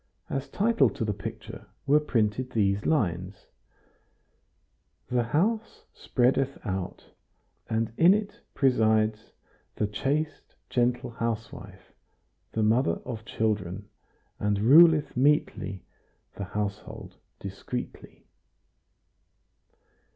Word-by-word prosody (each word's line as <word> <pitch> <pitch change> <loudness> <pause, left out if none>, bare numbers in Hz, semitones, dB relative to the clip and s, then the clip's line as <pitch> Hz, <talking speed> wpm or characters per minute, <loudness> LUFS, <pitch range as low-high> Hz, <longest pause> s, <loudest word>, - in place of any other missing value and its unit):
As 135 0 -3
title 200 - +3
to 110 - -4
the 105 - 0
picture 100 - -8 0.2
were 145 +2 +5
printed 125 -3 0
these 100 -2 +1
lines: 95 - -1 1.7
"The 120 -1 +2
house 210 - -1
spreadeth 135 +2 +1
out, 95 -3 -5 0.6
And 110 0 -1
in 175 +4 +7
it 210 -1 -4 0.2
presides 110 -4 +2 0.4
The 105 - 0
chaste 145 +8 -2 0.2
gentle 125 -1 +1
housewife, 115 -1 -5 0.6
The 110 - 0
mother 110 -5 +2
of 115 -3 -6
children; 105 -3 -2 0.5
And 105 -1 0
ruleth 155 +5 +6
metely 110 - +1 0.5
The 100 - -5
household 105 +2 -5 0.2
discreetly." 100 +6 -7
115 Hz, 90 wpm, -27 LUFS, 105-135 Hz, 1.7 s, in